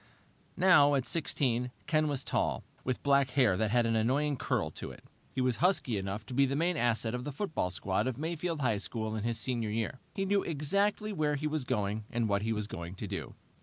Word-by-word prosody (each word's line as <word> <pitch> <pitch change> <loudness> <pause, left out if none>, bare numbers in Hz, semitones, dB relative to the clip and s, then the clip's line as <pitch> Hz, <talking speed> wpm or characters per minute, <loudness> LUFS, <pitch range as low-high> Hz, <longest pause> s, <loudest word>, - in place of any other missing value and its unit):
Now, 150 -6 +6
at 130 -2 0
sixteen, 125 -6 0 0.2
Ken 155 0 +2
was 140 -2 -1
tall, - - 0 0.2
with 130 -1 -2
black 140 -2 +4
hair 125 -7 +3
that 110 +3 +1
had 120 +2 +3
an 115 0 +1
annoying 140 +7 +2
curl - - -1
to - - -6
it. - - -12 0.3
He 130 - -2
was 125 -2 +1
husky 175 - +2
enough 100 +2 -3
to - - -7
be 135 +2 +4
the 135 - -1
main 170 +4 +1
asset 115 -3 +1
of 125 0 -3
the 145 - -4
football 155 - -2
squad 95 +4 -1
of 130 -3 -2
Mayfield 165 0 -2
High 115 -6 +2
School 110 +1 -3
in 110 - -3
his 115 0 -1
senior 120 -4 0
year. 115 +4 -2 0.2
He 195 - -1
knew 200 +1 +2
exactly 200 +8 0
where 150 -4 +1
he 145 +2 -3
was 150 -3 -1
going 105 -3 -1
and 120 -1 0
what 100 -1 +1
he 110 +2 -1
was 105 -1 -1
going 85 -2 -7
to - - -5
do. - - -5
130 Hz, 225 wpm, -31 LUFS, 110-150 Hz, 0.3 s, Now